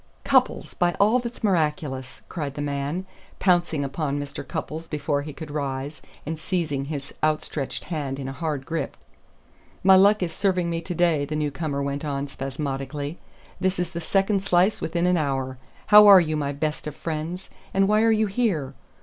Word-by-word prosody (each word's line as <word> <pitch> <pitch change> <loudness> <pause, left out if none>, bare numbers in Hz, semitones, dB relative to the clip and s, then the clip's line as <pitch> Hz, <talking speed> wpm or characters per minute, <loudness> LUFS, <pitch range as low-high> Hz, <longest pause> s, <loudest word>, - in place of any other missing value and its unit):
"Cupples, - - +2
by 175 -1 +1
all 215 +5 +5
that's 240 -1 -7
miraculous!" 150 -8 -1
cried 145 -5 -4
the 145 - -4
man, 145 +5 -2 0.3
pouncing 175 -5 +2
upon 140 +1 -2
Mr. 145 -1 -5
Cupples 160 +4 -5
before 145 -1 -1
he 150 +1 -6
could 155 0 -8
rise, 140 -1 -3 0.2
and 160 +1 -4
seizing 160 -5 -1
his 140 -2 -6
outstretched 155 -2 -1
hand 145 -5 -3
in 135 -1 -5
a - - -3
hard 150 -3 -3
grip. 165 +2 -3 0.9
"My 190 0 +8
luck 200 +1 +5
is 165 -2 -3
serving 180 -3 +1
me 165 0 -2
to 175 +1 -5
day," 165 -4 +2
the 150 - -4
newcomer 145 -1 -2
went 140 +1 -3
on 140 -1 -2
spasmodically. 140 +2 -4 0.4
"This 185 0 0
is 175 -1 -2
the 170 -1 -5
second 195 +3 +1
slice 190 +1 +2
within 170 +2 0
an 180 0 +3
hour. 135 -4 -2 0.3
How 210 0 +9
are 200 -2 +10
you, 155 -3 0
my 145 -2 -1
best 150 +2 -3
of 150 - -5
friends? 165 +4 -5 0.2
And 195 0 +3
why 210 +1 +4
are 225 - +4
you 220 0 +3
here? 195 - 0
155 Hz, 180 wpm, -25 LUFS, 140-180 Hz, 0.9 s, are